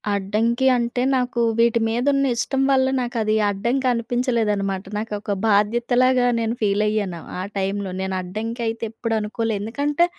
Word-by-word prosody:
అడ్డంకి 225 +6 +1
అంటే, 240 0 -1
నాకు 250 -1 -1 0.2
వీటి 235 0 +4
మీదున్న 275 +5 +1
ఇష్టం 265 +3 -1
వల్ల 260 -1 +3
నాకు 245 0 -3
అది 215 0 +1 0.2
అడ్డంకి 235 +7 0
అనిపించలేదనమాట. 225 -5 0
నాకొక 210 -1 -4 0.2
బాధ్యతలాగా 240 +4 +3
నేను 225 0 -1
ఫీలయ్యాను 205 -3 0 0.2
ఆ - - -2 0.2
టైంలో. 195 0 -2
నేను 190 0 -2
అడ్డంకైతే 225 +4 -4
ఎప్పుడు 225 0 -2
అనుకోలేదు. 215 0 -2
ఎందుకంటే, 285 +9 +1
230 Hz, 130 wpm, -22 LUFS, 210-245 Hz, 0.2 s, వీటి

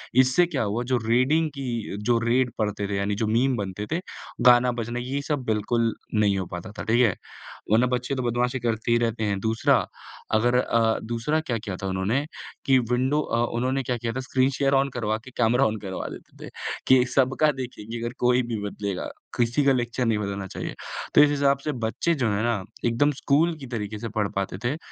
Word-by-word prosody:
इससे 130 +7 +5
क्या 150 -9 -2
हुआ 110 +4 -1
जो - - +4
रेडिंग 145 +7 +3
की 120 -6 -3
जो 120 -1 +3
रेड 125 +1 +2
पढ़ते 105 -1 -1
थे, 100 - -1
यानी 100 +1 0
जो - - +1
मीम 125 +4 +2
बनते 100 0 -4
थे, 165 - +1 0.5
गाना 125 0 +7
बजना, 120 +2 -3
ये 135 +3 -3
सब 145 -4 -1
बिल्कुल 115 +2 +1 0.2
नहीं 100 -2 +3
हो 95 - -3
पाता 90 +3 -7
था, - - -3
ठीक 115 +3 +3
है? 100 - +1 0.6
वरना 120 +3 +5
बच्चे 125 +2 -1
तो 130 - -2
बदमाशी 125 +2 0
करते 115 0 -1
ही 120 - +5
रहते 115 -1 -1
हैं, 100 -2 0
दूसरा, 110 +2 +2 0.6
अगर 120 +3 +3
अ, 115 -2 +2
दूसरा 120 +7 -1
क्या 120 -7 -2
किया 100 -3 -5
था - - -1
उन्होंने 100 +10 0 0.4
कि 130 -2 +5
विंडो 130 +5 +2
अ, 120 -4 0
उन्होंने 130 +2 0
क्या 120 0 -1
किया 115 0 -3
था, 130 - -3
स्क्रीन 130 +1 +1
शेयर 140 -1 +2
ऑन 135 +1 +2
करवा 110 -2 0
के 130 - -11
कैमरा 120 +3 +3
ऑन 110 0 -2
करवा 95 -2 -5
देते - - -11
थे - - -8 0.4
कि 130 -1 +6
सबका 135 +3 +3
देखेंगे, 120 -3 -6
अगर 120 +1 -4
कोई 125 +1 +3
भी 115 -3 -3
बदलेगा, 100 -2 -4 0.3
किसी 120 +4 +2
का 135 - +5
लेक्चर 120 0 -1
नहीं 110 -2 +2
बदलना 100 -1 -3
चाहिए। - - -5 0.4
तो - - +9
इस 150 - +6
हिसाब 140 -1 +2
से 150 - 0
बच्चे 165 +9 0
जो 115 -3 +2
हैं 100 +2 0
ना, 115 -5 0 0.2
एकदम 120 +6 +3
स्कूल 150 +5 +2
की 135 - -8
तरीके 110 -3 -4
से 115 0 -5
पढ़ 105 -2 +1
पाते 95 -1 -2
थे। 120 - +1
है 150 - -2
120 Hz, 215 wpm, -25 LUFS, 110-130 Hz, 0.6 s, तो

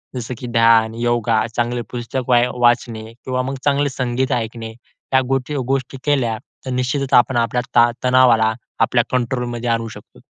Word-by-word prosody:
जसं 125 0 -4
की 125 - -6
ध्यान, 115 -1 +4
योगा, 115 -2 +1
चांगली 120 0 -1
पुस्तक 125 +1 -4
वाय 120 0 +4
वाचणे 120 -2 +2
किंवा 130 +1 -3
मग 135 +1 -4
चांगले 145 0 +2
संगीत 130 0 -2
ऐकणे 115 -1 -4 0.4
या 130 - +5
गोष्टी 135 +2 -1
गोष्टी 135 0 -2
केल्या 125 -6 +1 0.3
तर 130 - -4
निश्चितच 130 +2 -1
आपण 120 +1 +4
आपल्या 120 +1 +1
ता 120 0 +6
तणावाला 120 -4 +4 0.3
आपल्या - - +3
कंट्रोलमध्ये 120 -1 -2
आणू 115 0 0
शकतो. - - -14
120 Hz, 155 wpm, -19 LUFS, 115-130 Hz, 0.4 s, ता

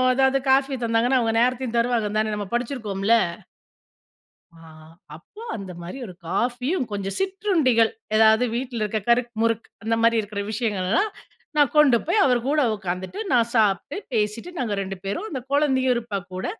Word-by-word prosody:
எதாவது 265 +1 +3
காஃபி 270 0 +3
தந்தாங்கன்னா, 235 +3 +2
அவங்க 225 -2 0
நேரத்தையும் 250 -1 0
தருவாங்கன்னு 230 -3 +1
தானே 215 0 0
நம்ம 205 -1 -4
படிச்சிருக்கோம்ல! 230 -4 0 1.4
ஆ - - -17 0.6
அப்போ, 170 - -15 0.2
அந்த 195 -3 -7
மாரி 175 +9 -7
ஒரு 185 - -9
காஃபியும், 250 - -1
கொஞ்சம் 195 -1 -3
சிற்றுண்டிகள் 355 - +2 0.2
ஏதாவது 220 +2 +5
வீட்ல 245 -2 -3
இருக்கிற 215 +1 -2
கறுக் 240 0 +2
முறுக் 230 0 0 0.2
அந்த 225 +1 +1
மாரி 230 0 +4
இருக்கிற 205 -1 -5
விஷயங்கள்லாம், 215 - 0 0.5
நான் 290 -4 +4
கொண்டு 285 -5 +6
போய் 400 +5 +3
அவர் 250 -2 +3
கூட 300 +2 +2
உக்காந்துட்டு, 185 - -5
நான் 235 -2 +3
சாப்ட்டு, 210 -4 +1 0.2
பேசிட்டு 215 +8 -1
நாங்க 235 -5 -1
2 195 0 -5
பேரும் 200 - -3
அந்த 265 -6 -4
குழந்தையும் 265 -3 +3
இருப்பா 230 -4 -3
கூட, 185 - -4
235 Hz, 150 wpm, -23 LUFS, 210-260 Hz, 1.4 s, கொண்டு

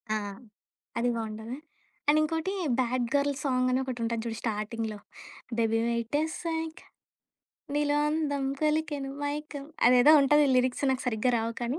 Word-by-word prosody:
ఆ! - - +2 0.8
అది 240 +1 +1
బావుంటది. 220 +2 -5 0.5
అండ్ 300 +1 +5
ఇంకోటి 325 +4 -1 0.3
'బ్యాడ్‌ 250 0 +1
గర్ల్' 285 0 +2
సాంగని 255 -2 +2
ఒకటి 255 -2 -5
ఉంటది 230 0 -1
జూడు 225 -1 -3
స్టార్టింగ్‌లో 220 0 -3 0.6
డెబీవయిట్ 230 +2 +1
ఎస్‌సై‌క్ 320 0 -4 0.9
నిలో 290 0 +2
అందం 295 -3 -1 0.2
కొలికెను 300 -3 0
మైకం 290 0 -4 0.2
అదేదో 250 +5 +7
ఉంటది 295 +2 +5
లిరిక్స్ 255 +2 +1
నాకు 260 - -3
సరిగ్గా 235 +2 +1
రావు 225 +1 -2
కానీ. 240 +5 -2
255 Hz, 125 wpm, -28 LUFS, 235-295 Hz, 0.9 s, అదేదో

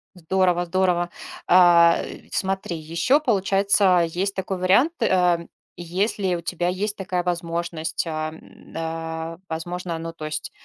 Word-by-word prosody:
Здорово 180 0 +1
здорово. 175 -1 +1 0.4
А, 175 -2 +6
э, - - -10
смотри, 190 -3 -2
ещё 170 - +1
получается, 195 - +3
есть 190 +4 -2
такой 190 0 -3
вариант, 200 - +3
э. 180 -5 +2 0.3
Если 185 +2 -1
у 170 - -2
тебя 175 +1 -2
есть 200 +3 -2
такая 180 -2 -2
возможность, 170 -2 -2
а, 155 0 -3
м, 160 - -16
а, 165 0 -4
возможно, 170 +1 -4
ну, 165 0 -5
то 155 -2 -8
есть 155 0 -4
175 Hz, 135 wpm, -23 LUFS, 165-190 Hz, 0.4 s, А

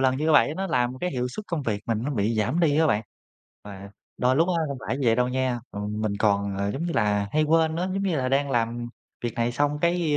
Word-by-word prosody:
lần 130 -1 +2
như 155 +2 +1
vậy 150 - +5
nó 195 0 -2
làm 125 -5 0
cái 180 - -2
hiệu 125 -3 -2
suất 210 +10 -7
công 165 -4 -2
việc 105 -4 -2
mình 115 -2 0
nó 140 - -2
bị 110 -3 0
giảm 110 +10 0
đi 155 -3 +3
á 160 - +4
bạn. 110 -7 +1 0.6
Và 100 -1 -9 0.3
đôi 130 +1 +2
lúc 165 +4 +3
á 180 - +1
không 140 -2 -4
phải 130 - 0
như 135 - -1
vậy 115 -1 +4
đâu 125 0 +2
nha, 130 -1 0
ừm, 105 +1 -4
mình 105 -2 -1
còn, 100 -2 +1
ờ, 100 +1 0
giống 150 +8 -3
như 175 - -2
là 105 -2 +1
hay 155 - +3
quên 160 0 +3
nữa, 180 +2 -1
giống 195 - -1
như 185 -5 0
là 130 -2 0
đang 140 +1 +1
làm 120 -1 -1 0.4
việc 120 - -2
này 120 0 0
xong 145 +3 0
cái, 170 -3 +1
130 Hz, 270 wpm, -25 LUFS, 110-155 Hz, 0.6 s, vậy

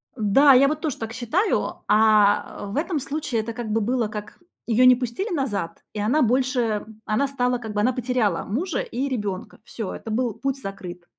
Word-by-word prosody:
Да, 260 +5 +5
я 270 +2 +6
вот 305 +1 -2
тоже 305 -5 -2
так 225 0 -6
считаю. 305 - -1
А 210 -1 +3
в 200 - -5
этом 315 0 0
случае 275 -4 -2
это 230 +1 -6
как 240 -2 -5
бы 225 +1 +1
было, 240 +1 0
как 210 +4 -8 0.3
её 240 +2 +4
не 255 0 +8
пустили 260 - -3
назад, 210 - -3
и 210 - -5
она 245 +9 +2
больше 255 +2 +2 0.3
м, 220 0 -15
она 265 +6 +1
стала 250 -2 0
как 220 -3 -7
бы 210 - 0
она 255 +4 +2
потеряла 245 -3 0
мужа 315 - -2
и 270 +4 -3
ребёнка. 205 -7 -4
Всё, 220 -5 -6
это 225 - -7
был 235 0 0
путь 275 0 -3
закрыт. 180 -4 -8
240 Hz, 200 wpm, -23 LUFS, 215-270 Hz, 0.3 s, не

